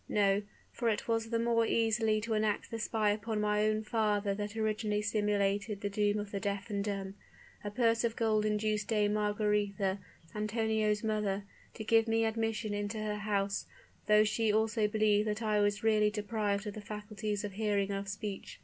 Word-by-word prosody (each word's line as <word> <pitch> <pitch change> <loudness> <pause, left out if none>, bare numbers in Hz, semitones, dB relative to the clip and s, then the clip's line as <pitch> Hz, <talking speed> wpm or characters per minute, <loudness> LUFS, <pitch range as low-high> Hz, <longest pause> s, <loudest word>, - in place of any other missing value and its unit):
No; 200 -1 +3 0.3
for 235 -1 0
it 215 - -1
was 225 -1 0
the 230 - +1
more 230 0 +2
easily 225 -1 +2
to 225 +1 -2
enact 215 -1 0
the 225 - -4
spy 215 -1 +1
upon 215 +1 -2
my 210 0 +2
own 215 0 0
father 210 -2 +1
that 205 +2 -5
originally 215 -1 0
simulated 205 -1 0
the 205 - -2
doom 205 0 +1
of 205 -1 -4
the 200 - -2
deaf 200 +2 -3
and 200 -1 -1
dumb. 195 -2 -3 0.5
A 205 - -3
purse 230 +1 +2
of 230 -1 0
gold 215 -2 +2
induced 210 0 0
Dame 210 -1 +2
Margaretha, 205 -2 0 0.3
Antonio's 215 0 0
mother, 210 -2 0 0.3
to 220 - -5
give 225 +1 +3
me 225 0 +2
admission 225 -1 -1
into 205 +1 -3
her 215 -1 -2
house; 200 -2 -1 0.4
though 210 0 +6
she 215 +1 +1
also 215 0 +2
believed 210 0 +2
that 210 +2 -2
I 215 -1 +2
was 205 0 +1
really 215 -1 +4
deprived 210 -1 -1
of 210 - -4
the 215 - -7
faculties 210 0 -4
of 205 - -4
hearing 200 -1 0
and 195 - -1
of 200 - -7
speech. 205 0 -6
210 Hz, 185 wpm, -32 LUFS, 205-220 Hz, 0.5 s, though